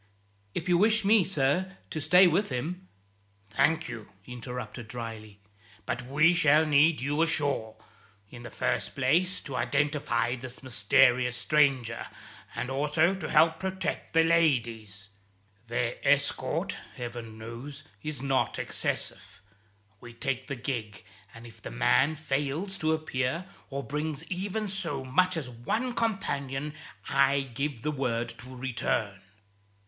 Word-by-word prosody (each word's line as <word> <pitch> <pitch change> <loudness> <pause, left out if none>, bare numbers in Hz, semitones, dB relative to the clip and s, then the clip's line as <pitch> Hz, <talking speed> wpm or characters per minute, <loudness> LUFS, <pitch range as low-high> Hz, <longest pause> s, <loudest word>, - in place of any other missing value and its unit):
"If 165 - -3
you 175 -1 +4
wish 215 +1 +4
me, 210 -1 +6
sir, 180 +3 0
to 155 - -3
stay 180 +5 +7
with 180 +4 +2
him 170 +9 -4 0.3
" 100 0 -37
"Thank 160 +8 +2
you," 115 -6 -8
he 125 - -9
interrupted 125 -1 -6
dryly, 110 -3 -7 0.5
"but 120 0 -2
we 155 +6 +5
shall 155 -2 +5
need 150 0 +4
you 145 +4 0
ashore; 145 -9 +1 0.6
in 120 - -10
the 120 - -8
first - - -1
place 165 +8 +2
to - - -9
indentify 130 -2 0
this 130 +1 -6
mysterious 125 +1 +3
stranger, 130 -4 +2 0.5
and 125 - -3
also 150 +6 +2
to 190 - -5
help 160 0 +4
protect 190 0 -3
the 165 0 +5
ladies. 115 -11 +1 0.6
Their 120 0 -1
escort, 145 +1 +1 0.2
Heaven 120 -2 -7
knows, 115 +6 -8 0.2
is 150 -4 -4
not 135 -1 +1
excessive. - - -3 0.6
We 120 0 -12
take 135 +1 -2
the 140 - -3
gig, 120 -5 -4 0.3
and 115 +1 -12
if 115 - -14
the - - -6
man 135 - +3
fails 150 +6 -2
to 155 0 +1
appear, 155 +1 -1 0.2
or 140 0 -4
brings 150 +1 -3
even 200 +4 -2
so 165 -9 -3
much 185 +7 +2
as 150 -5 -3
one 210 - -2
companion, 150 - -2 0.3
I 140 0 +3
give 135 0 -4
the 150 - 0
word 120 -5 -1
to 130 +3 -10
return." 115 -5 -2
140 Hz, 140 wpm, -28 LUFS, 120-160 Hz, 0.6 s, stay